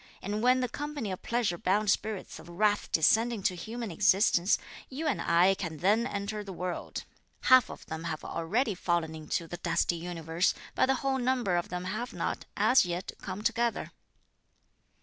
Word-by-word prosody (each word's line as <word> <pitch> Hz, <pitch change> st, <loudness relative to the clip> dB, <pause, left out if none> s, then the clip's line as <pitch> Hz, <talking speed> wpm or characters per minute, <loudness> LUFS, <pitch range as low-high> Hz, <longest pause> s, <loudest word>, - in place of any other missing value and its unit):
And 205 Hz, +2 st, -2 dB
when 255 Hz, +2 st, +4 dB
the 250 Hz, -, +1 dB
company 290 Hz, -4 st, -4 dB
of 185 Hz, -, -5 dB
pleasure 230 Hz, -8 st, 0 dB
bound 205 Hz, +2 st, +2 dB
spirits 215 Hz, -2 st, -3 dB
of 170 Hz, -, -13 dB
wrath 205 Hz, +4 st, +1 dB
descend 220 Hz, +9 st, +4 dB
into 200 Hz, -5 st, 0 dB
human 220 Hz, +5 st, -5 dB
existence, 195 Hz, 0 st, +4 dB, 0.3 s
you 285 Hz, +5 st, -5 dB
and 285 Hz, -8 st, 0 dB
I 180 Hz, +3 st, +4 dB
can 170 Hz, -5 st, -5 dB
then 210 Hz, +8 st, +2 dB
enter 210 Hz, -1 st, -4 dB
the 200 Hz, -, -8 dB
world. 180 Hz, -1 st, -4 dB, 0.4 s
Half 255 Hz, -2 st, +6 dB
of -, -, -10 dB
them 160 Hz, +1 st, -6 dB
have 160 Hz, -2 st, -4 dB
already 210 Hz, +8 st, 0 dB
fallen 170 Hz, -3 st, -1 dB
into 160 Hz, +1 st, -3 dB
the 175 Hz, -, -6 dB
dusty 170 Hz, -, 0 dB
universe, 165 Hz, 0 st, -1 dB, 0.2 s
but -, -, +3 dB
the 270 Hz, -, +3 dB
whole 265 Hz, -1 st, +1 dB
number 245 Hz, -7 st, +1 dB
of 175 Hz, -, -1 dB
them 180 Hz, 0 st, -4 dB
have 215 Hz, +7 st, -4 dB
not, -, -, -3 dB
as 260 Hz, -, +5 dB
yet, 175 Hz, +1 st, -3 dB
come 195 Hz, +2 st, -6 dB
together." 235 Hz, +1 st, 0 dB
200 Hz, 175 wpm, -30 LUFS, 175-235 Hz, 0.4 s, Half